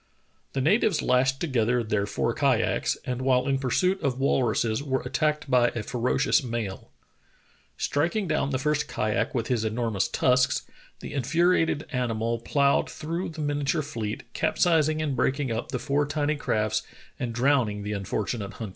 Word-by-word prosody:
The 135 - -1
natives 200 - +2
lashed 130 +1 +2
together 125 -5 +1
their 105 -2 -1
four - - -1
kayaks, - - +1
and 125 0 -3
while 130 -1 +2
in 135 -1 +1
pursuit 180 +9 +1
of 135 -4 0
walruses 120 -3 +1
were 135 -2 -1
attacked 150 -2 0
by 125 -2 +4
a 115 - -2
ferocious 125 +6 +1
male. 115 -6 -4 0.9
Striking 175 +7 0
down 155 -3 0
the 130 - 0
first 150 +2 0
kayak 110 +6 -1
with 115 -2 0
his 120 -3 0
enormous 110 -3 0
tusks, 130 +1 +2 0.4
the - - -7
in 140 - 0
furiated 165 +2 +2
animal 115 -2 -1
ploughed 140 +4 +2
through 165 +4 -4
the 160 -1 -7
miniature 145 +1 0
fleet, 110 -6 -4
capsizing 155 -2 +2
and 145 -3 -1
breaking 130 +1 0
up 115 - -3
the 130 - -1
four 145 +3 0
tiny 145 +1 0
crafts 110 -7 0 0.4
and 120 - -2
drowning 120 -4 +1
the 105 +1 -3
unfortunate 100 +1 -3
hunters. 110 -3 -6
130 Hz, 160 wpm, -26 LUFS, 115-145 Hz, 0.9 s, by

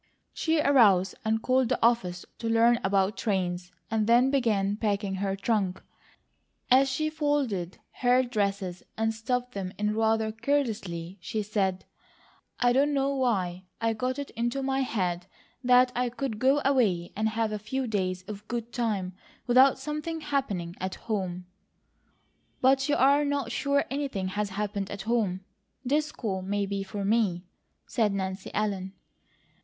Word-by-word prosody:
She 320 -1 +1
arose 210 -11 +5
and 220 0 0
called 255 -1 +2
the 250 - +2
office 185 -7 +1
to 230 - -2
learn 230 +1 +4
about 195 +1 +2
trains, 180 -3 -2 0.2
and 220 -1 +1
then 245 +3 +5
began 210 -7 +1
packing 200 -2 -1
her 195 -1 0
trunk. 195 -2 0 0.9
As 270 +2 +6
she 310 +4 -1
folded 280 - -1 0.2
her 250 +1 +4
dresses 200 -6 -2 0.2
and 225 0 +1
stuffed 250 +2 -2
them 190 -4 -4
in 210 0 0
rather 220 0 +2
carelessly 215 -8 -2
she 215 +3 -3
said: 195 -3 -1 0.7
"I 245 -1 +4
don't 285 +3 +3
know 275 0 +1
why 190 -9 -1
I 225 0 +1
got 255 +4 -2
it 285 -1 -5
into 240 +4 -2
my 270 0 0
head 185 -8 -1 0.4
that 250 0 +5
I 250 0 +1
could 245 -3 -4
go 270 +3 +3
away 210 -11 +2
and 220 +1 +1
have 220 0 -1
a 210 - -3
few 265 +6 -3
days 185 -5 -1
of 200 +1 -7
a - - -38
good 235 +1 -5
time 205 -6 -1 0.3
without 255 +2 +6
something 305 +2 -4
happening 225 - -2
at 185 0 -3
home." 185 -5 -3 1.1
"But 265 +2 +3
you 295 - +3
are 280 +3 +4
not 285 -4 -1
sure 280 +2 +1
anything 270 -10 -2
has 205 +1 -2
happened 200 0 -3
at 200 -1 -6
home. 215 -5 0 0.4
This 300 +4 +1
call 195 -5 -3
may 200 +2 -1
be 200 0 -3
for 195 +1 -4
me," 200 -5 +1 0.4
said 220 -3 +1
Nancy 190 0 -4
Ellen. 195 -3 -2
220 Hz, 155 wpm, -28 LUFS, 195-255 Hz, 1.1 s, As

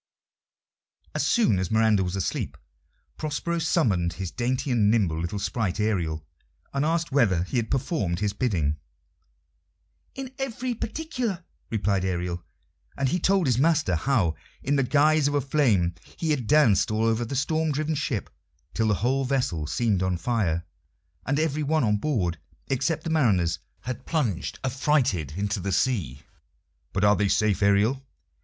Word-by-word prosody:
As - - 0
soon 215 - +3
as 95 - -2
Miranda 110 -3 +3
was 90 +1 -3
asleep, 95 - -2 0.6
Prospero 160 +3 -2
summoned 105 - +1
his 90 0 -5
dainty 130 +2 -1
and 110 -4 +3
nimble 95 -8 +2
little 85 +4 -3
sprite, 100 -1 -2
Ariel, 85 -8 -1 0.5
and 140 0 0
asked 165 +1 0
whether 105 -11 +3
he 95 - -3
had 115 -2 -1
performed 130 - -1
his 105 -1 0
bidding. 80 - 0 1.4
"In 265 -1 -6
every 255 -1 -2
particular," 235 - -3 0.3
replied 100 -4 0
Ariel; 90 -2 -2 0.5
and 140 -1 +1
he 180 - 0
told 190 0 +2
his 125 -3 +2
master 155 - +3
how, 95 - +1 0.3
in 140 +2 +1
the 140 - +3
guise 150 +3 +3
of 145 - 0
a - - +4
flame, 120 - +2 0.2
he 160 -2 -1
had 130 -7 -1
danced 120 -10 +4
all 110 +1 +1
over 115 +1 +1
the 120 +4 -4
storm 155 +4 +1
driven 155 +2 -1
ship 140 -8 -2 0.4
till 110 - +1
the 105 - +3
whole 135 +2 +2
vessel 125 - -1
seemed 105 0 +1
on 95 -1 0
fire, 90 -7 0 0.6
and 140 +1 +1
every 155 -1 0
one 155 0 +1
on 105 -2 +2
board 100 - -1 0.3
except 135 +5 0
the 165 - -3
mariners 95 - +2 0.2
had 125 +1 -6
plunged 120 - -1
affrighted 130 - +1
into 100 +1 -1
the 95 +2 -3
sea. 90 - 0 0.7
"But 95 - -1
are 105 0 +6
they 100 +1 +1
safe, 105 0 +2
Ariel?" 105 +7 +3
115 Hz, 160 wpm, -26 LUFS, 95-150 Hz, 1.4 s, are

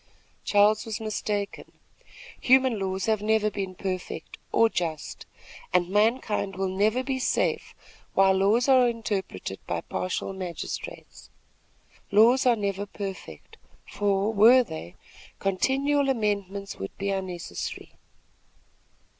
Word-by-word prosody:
Charles 205 +1 +4
was 225 -2 -5
mistaken. 210 -2 -4 0.7
Human 260 -3 +4
laws 190 0 -2
have 220 -2 +1
never 215 0 +2
been 190 -2 -4
perfect 185 -1 -5
or 230 - +5
just, 165 -7 -4 0.4
and 180 -1 +2
mankind 210 -1 +1
will 190 0 -1
never 210 +7 +1
be 265 -1 -2
safe - - -1 0.4
while 195 0 +5
laws 205 +6 +3
are 260 -2 +6
interpreted 200 - -4
by 85 -1 -2
partial 185 +1 -3
magistrates. 190 - -7 0.8
Laws 235 +6 +5
are 245 - +5
never 200 -1 -3
perfect, 195 - -8 0.3
for, 205 +1 0
were 235 +5 +7
they, 160 - -8 0.4
continual 275 +9 +1
amendments 200 -4 -2
would 95 0 -7
be 200 0 -2
unnecessary. 185 -3 -5
205 Hz, 115 wpm, -26 LUFS, 190-225 Hz, 0.8 s, were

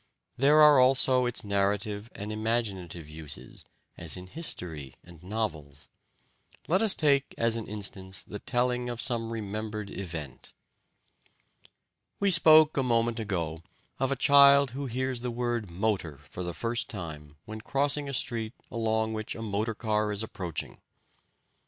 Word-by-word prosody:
There 150 +4 +5
are 150 -3 +7
also 130 -1 +4
its 120 - +1
narrative 100 +1 -1
and 105 +1 -5
imaginative 100 -7 -2
uses, 75 -1 -7 0.3
as 85 0 +1
in 90 - -9
history 85 - -3
and 85 -2 -15
novels. 90 -8 -5 0.8
Let 185 +5 +2
us 220 -3 +5
take 140 -2 +2
as 115 -1 +2
an 115 -2 -5
instance 100 -2 +1
the 105 - -8
telling 125 +1 -1
of 120 -1 -5
some 115 -2 0
remembered 110 -1 -5
event. 80 -8 -7 1.7
We 200 -1 +2
spoke 155 -3 +6
a - - +3
moment 115 -2 +1
ago 85 -7 -3 0.4
of 135 0 0
a - - +1
child 140 0 +6
who 140 +2 -5
hears 130 +1 -2
the 125 +1 -4
word 120 -3 -2
"motor" 90 -5 -2
for 90 - -6
the 85 -1 -4
first 120 0 -2
time 80 -6 -7
when 110 0 -8
crossing 140 +3 0
a - - -5
street 115 -3 -1 0.2
along 110 -1 0
which 110 -1 -5
a 115 - -6
motor 110 +1 -2
car 105 -1 -1
is 105 +1 -3
approaching. 90 -7 -5
110 Hz, 145 wpm, -28 LUFS, 95-125 Hz, 1.7 s, are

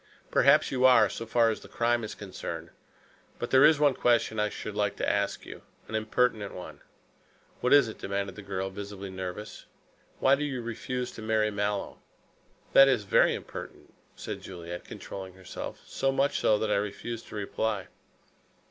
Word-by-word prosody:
"Perhaps - - +5
you 130 -1 0
are, 130 -1 +7
so 115 - -6
far 115 0 +3
as 110 - -4
the - - -13
crime 120 0 +1
is 110 - -5
concerned. 100 -3 -7 0.7
But - - -4
there 130 +1 +7
is 150 0 +6
one 145 -2 +4
question 120 -3 +2
I 105 0 +2
should - - -6
like - - 0
to - - -2
ask - - 0
you. - - -9 0.3
An - - -10
impertinent 110 -1 0
one." 90 - -9 0.8
"What 125 - 0
is 145 -4 +7
it?" 110 - -8
demanded 100 -1 -3
the 105 - -8
girl, 95 -1 -3
visibly 100 -1 -7
nervous. 95 +3 -7 0.5
"Why 135 - +4
do 140 +2 +2
you 130 -5 -3
refuse 125 +2 -4
to - - -10
marry 110 -1 +1
Mallow?" 100 0 -2 0.7
"That 135 - +9
is 125 -6 +2
very 95 - +4
impertinent," - - -9 0.2
said - - -6
Juliet, 85 -1 -8
controlling 95 -1 -8
herself; 95 -1 -7
"so 135 - 0
much 135 +1 +1
so 105 - +3
that 110 0 -1
I 100 - +3
refuse 105 +3 -4
to - - -10
reply." 105 -1 -2
110 Hz, 175 wpm, -28 LUFS, 100-125 Hz, 0.8 s, That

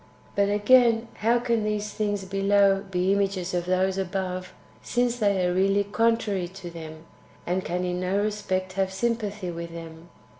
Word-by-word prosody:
6. - - -26
But, 200 0 +3
again, 230 +2 +4
how 230 +3 +3
can 235 -2 0
these 210 0 -2
things 205 -2 -1
[below] 195 0 +3
be 185 +1 +1
images 195 -2 -1
of 175 0 -1
those 185 +1 +1
[above], 185 -1 -3 0.3
since 245 0 0
they 200 -4 +2
are 180 - +1
really 195 +2 +3
contrary 210 -3 +1
to 185 -1 -9
them, 160 -1 -9 0.4
and 185 +2 -1
can 180 +1 -2
in 180 0 -2
no 185 +2 0
respect 205 -3 -2
have 190 0 0
sympathy 205 -3 -2
with 170 0 -6
them? 165 0 -10
195 Hz, 165 wpm, -26 LUFS, 180-210 Hz, 0.4 s, again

